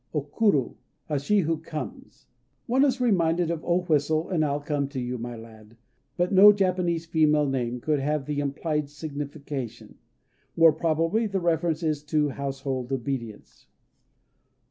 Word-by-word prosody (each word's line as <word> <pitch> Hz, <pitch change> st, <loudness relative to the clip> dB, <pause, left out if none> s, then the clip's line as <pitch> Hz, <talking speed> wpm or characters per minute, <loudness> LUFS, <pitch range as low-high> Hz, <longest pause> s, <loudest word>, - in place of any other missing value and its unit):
O 150 Hz, -, 0 dB
Kuru 145 Hz, -, +1 dB, 0.5 s
"She 200 Hz, +9 st, +2 dB
who 165 Hz, -1 st, 0 dB
Comes" 155 Hz, -4 st, -8 dB, 0.2 s
(?). 130 Hz, 0 st, -46 dB
One 260 Hz, +3 st, +3 dB
is 265 Hz, -2 st, +2 dB
reminded 175 Hz, -7 st, +2 dB
of, 165 Hz, -2 st, -4 dB
"O 175 Hz, +1 st, +1 dB
whistle, 155 Hz, -1 st, +1 dB
and 165 Hz, -4 st, +2 dB
I'll 145 Hz, -1 st, 0 dB
come 145 Hz, -1 st, -2 dB
to 140 Hz, -1 st, -6 dB
you, 125 Hz, 0 st, -3 dB
my 120 Hz, +1 st, -5 dB
lad" 110 Hz, 0 st, -14 dB, 0.4 s
but 175 Hz, +2 st, 0 dB
no 200 Hz, +2 st, +9 dB
Japanese 180 Hz, -4 st, 0 dB
female 150 Hz, -2 st, +3 dB
name 125 Hz, -2 st, -2 dB
could 150 Hz, +3 st, 0 dB
have 150 Hz, 0 st, -1 dB
the 150 Hz, -1 st, -2 dB
implied 145 Hz, +1 st, -2 dB
signification. 145 Hz, -4 st, -7 dB, 0.6 s
More 165 Hz, -1 st, +7 dB
probably 165 Hz, +7 st, 0 dB
the 195 Hz, -1 st, -1 dB
reference 170 Hz, -1 st, 0 dB
is 155 Hz, -2 st, 0 dB
to 150 Hz, -1 st, +1 dB
household 135 Hz, -2 st, -4 dB
obedience. 120 Hz, -4 st, -5 dB
150 Hz, 150 wpm, -26 LUFS, 135-170 Hz, 0.6 s, no